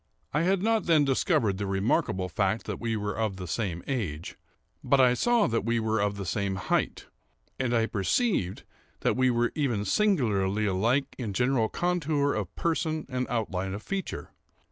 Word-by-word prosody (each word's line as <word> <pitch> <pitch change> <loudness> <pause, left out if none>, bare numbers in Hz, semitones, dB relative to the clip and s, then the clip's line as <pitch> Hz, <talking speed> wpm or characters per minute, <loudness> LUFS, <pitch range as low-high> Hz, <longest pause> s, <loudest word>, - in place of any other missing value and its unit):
I 150 - +2
had 190 +2 +2
not 225 0 +2
then 155 -4 +5
discovered 110 -7 +1
the 100 - -2
remarkable 95 -1 0
fact 100 +3 0
that - - -4
we 115 -1 -1
were 105 -1 -3
of 110 -3 -1
the 90 -1 -6
same 85 -2 -2
age; 90 - -3 0.5
but 140 - +3
I 125 -1 +6
saw 235 - +3
that 115 -3 0
we 115 +1 +1
were 110 0 0
of 100 0 0
the 100 - -4
same 100 +2 -1
height, 95 - -1 0.5
and 130 -2 0
I 115 -2 +3
perceived 100 - 0 0.4
that - - +1
we 130 0 +3
were 120 0 +1
even 120 -9 0
singularly 110 - +2
alike 115 +8 +1
in 110 -5 -3
general 125 0 +2
contour 155 -5 0
of 105 -5 -4
person 160 -2 -1
and 125 -1 -2
outline 95 -5 -2
of 105 - -8
feature. 195 -1 -4
115 Hz, 175 wpm, -28 LUFS, 100-140 Hz, 0.5 s, I